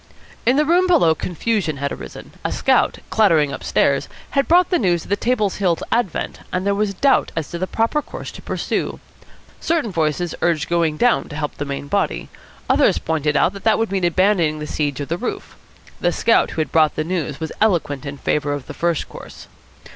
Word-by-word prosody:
In 250 - +5
the 300 +2 +3
room 355 +4 +3
below 305 - +5
confusion 175 -1 -2
had 140 +1 -2
arisen. - - -9
A - - -1
scout, - - +2
clattering 165 -10 +3
upstairs, 140 -1 +1 0.2
had 275 -1 +1
brought 355 +3 +4
the 355 - +3
news 175 -5 +1
of - - -14
the - - +4
Table 215 -2 0
Hillites' 180 -5 0
advent, 230 -6 -1
and 185 +1 -2
there 200 - +2
was 200 -1 -1
doubt 275 +7 +3
as 165 -3 -3
to 170 - -4
the 185 - -1
proper 230 +9 0
course - - -8
to - - -11
pursue. - - -3 0.6
Certain 320 -10 0
voices 160 0 -1
urged 165 -4 +1
going 165 -3 +1
down 245 +5 +2
to 150 - -8
help 150 -1 -3
the 145 - -3
main 140 0 -5
body. - - -1 0.4
Others - - +4
pointed 155 -2 0
out 185 - +3
that 200 - -10
that 220 -1 +4
would 225 -3 -1
mean 195 -2 -1
abandoning 175 -3 +2
the 150 - -5
siege 145 -3 -2
of 145 - -4
the 170 +2 -2
roof. 250 - -5 0.4
The 175 - +2
scout 230 +6 +3
who 160 - -2
had 155 - -3
brought 155 -2 +3
the 155 - -1
news 155 -5 -3
was 160 -1 -4
eloquent 170 -10 +1
in 140 -1 -6
favour 145 +1 0
of 140 -3 -5
the - - -8
first 170 -2 -1
course. - - -11
170 Hz, 205 wpm, -20 LUFS, 150-215 Hz, 0.6 s, In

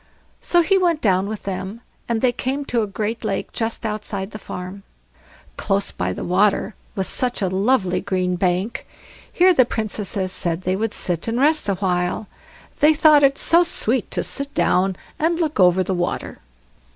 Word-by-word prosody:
So 345 -1 +3
he 390 +3 +3
went 340 -4 +1
down 190 -4 +1
with 215 0 -6
them, 195 +3 -5 0.3
and 230 -1 0
they 255 - +3
came 265 +4 -3
to 240 -3 0
a 215 - -2
great 215 +3 -4
lake 200 -3 -3
just 225 0 -3
outside 210 -2 -4
the 215 - -8
farm. 185 0 -8 0.8
Close 195 0 0
by 90 +1 -3
the - - -5
water 200 +4 +1 0.2
was 190 - -1
such 250 +4 +1
a 190 - 0
lovely 190 -1 +1
green 185 -1 -1
bank; 185 +4 -1 0.4
here 365 +1 +4
the 260 - +5
Princesses 205 -4 -3
said 175 -1 -3
they 185 +1 0
would 220 +2 -2
sit 175 +1 -2
and 230 +2 -1
rest 300 -4 +3
a 195 - +1
while; 180 +1 -1 0.5
they 305 +2 +5
thought 300 -1 +6
it 275 0 +3
so 340 +1 +5
sweet 345 - +1
to - - -2
sit 280 0 -2
down 190 +1 +2 0.2
and 330 +2 +1
look 310 -7 -1
over 180 0 +5
the 190 - -2
water. 175 -1 -3
210 Hz, 180 wpm, -21 LUFS, 185-260 Hz, 0.8 s, thought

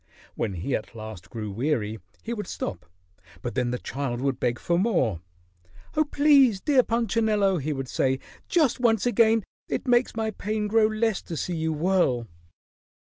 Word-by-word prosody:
When 105 -4 -2
he 95 +10 -2
at 110 - -6
last 110 -5 -8
grew 110 -3 -5
weary, 110 -2 -1 0.2
he 235 - -3
would 210 -5 -5
stop, 85 - -5 0.6
but 120 - -3
then 125 -2 0
the 125 - -1
child 130 -2 -3
would 135 0 -1
beg 120 -1 0
for 170 0 0
more. 150 - +1 0.7
"Oh, 310 0 +3
please, 280 -7 +5
dear 270 +4 +4
Punchinello," 220 -4 +1
he 150 +2 -2
would 135 -2 -3
say, 130 +1 +1 0.3
"just 300 -8 +2
once 230 -2 +2
again. 225 -2 +4 0.3
It - - -2
makes 245 -1 +3
my 220 -1 -1
pain 210 +1 -2
grow 215 +1 +4
less 215 -1 0
to 165 - -6
see 175 - -2
you 160 0 -1
whirl." 155 -7 +1
185 Hz, 170 wpm, -26 LUFS, -, 0.7 s, please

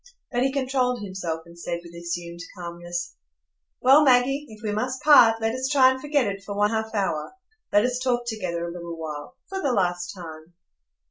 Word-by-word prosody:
But 245 -1 0
he 265 +1 +2
controlled 255 -4 0
himself, 180 -5 -4
and 170 0 -15
said, 170 0 -4
with 170 0 -13
assumed 170 0 -5 0.2
calmness: 175 0 -5 0.7
"Well, 275 +4 +7
Maggie, 270 +2 +3
if 215 0 -13
we 210 - -1
must 255 +5 -2
part, 230 -7 +7
let 225 0 0
us 260 +1 -2
try 260 -3 +6
and 260 0 -4
forget 290 -3 +1
it 195 -1 -3
for 200 0 -6
one 205 +1 +3
half 220 0 -2
hour; 190 - -1 0.4
let 205 +3 +4
us 250 0 -1
talk 250 -2 0
together 185 -7 -3
a - - -5
little 170 -1 -7
while, 155 - -7
for 385 0 -4
the 275 - +1
last 175 -4 0
time." 165 -2 -10
210 Hz, 195 wpm, -25 LUFS, 170-255 Hz, 0.7 s, Well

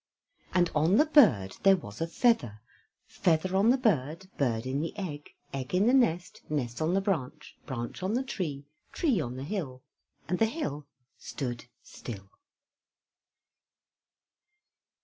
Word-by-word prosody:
And 175 -2 +2
on 160 +6 +3
the 300 - +5
bird 130 - +4
there 195 -1 +6
was 105 - -10
a 165 - 0
feather; 165 - +1 0.5
Feather 175 +2 0
on 200 +4 +4
the 255 - +5
bird, 185 - 0
bird 115 -5 0
in 135 +2 -1
the 165 +5 -5
egg, 150 -7 -6 0.2
egg 135 +4 -3
in 190 +3 +3
the 245 - +4
nest, 180 -10 +1
nest 130 -4 -2
on 165 +4 +1
the 195 - +2
branch, 155 -7 -3
branch 120 +4 -5
on 190 +4 -1
the 255 - 0
tree, 155 - -4 0.3
tree 270 - +1
on 125 -3 -5
the 130 - -6
hill, 140 -7 -5 0.4
and 180 - -1
the 225 - +4
hill 150 - -4 0.3
stood 120 -5 -5 0.2
still. 100 -5 -9
160 Hz, 150 wpm, -29 LUFS, 130-195 Hz, 0.5 s, there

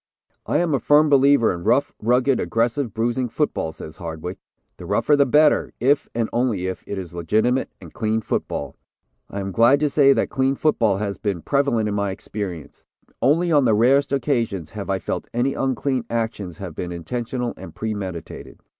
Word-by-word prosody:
"I - - +1
am 170 -3 +1
a 135 - +2
firm 150 +3 +4
believer 140 -5 +4
in 85 -1 -7
rough, 120 +6 +2
rugged, 125 +3 +2
aggressive, 115 +2 0
bruising 120 +4 -1
football," 130 - -1
says 80 0 -11
Hardwick. 85 +1 -6 0.4
"The - - -9
rougher, 150 - +3
the 140 -1 +3
better, 150 +3 +3
if, 140 +3 +2
and 115 -1 0
only 120 -6 0
if, 95 0 -4
it 100 - -4
is 90 -3 -7
legitimate 110 +10 +1
and - - -13
clean 110 0 -1
football. 70 -8 -3 0.5
I 100 - -4
am 95 0 -4
glad 120 +8 +4
to 150 -2 +1
say 140 -1 +5
that - - -1
clean 135 +1 +1
football 115 -10 +2
has 100 -2 -3
been 100 -6 -2
prevalent 140 -6 +1
in 105 - -2
my 100 -1 0
experience. 95 -6 -6 0.4
Only 165 +7 +3
on 145 -4 +4
the 110 -3 +4
rarest 135 +6 +3
occasions 120 - -1
have 100 -1 -6
I 95 - +1
felt 90 - -4
any 130 +3 +1
unclean 130 -1 -1
actions 110 -7 -3
have 95 -4 -7
been 90 +3 -5
intentional 120 +7 -4
and 85 -3 -11
premeditated. 100 -7 -6
115 Hz, 180 wpm, -22 LUFS, 95-135 Hz, 0.5 s, say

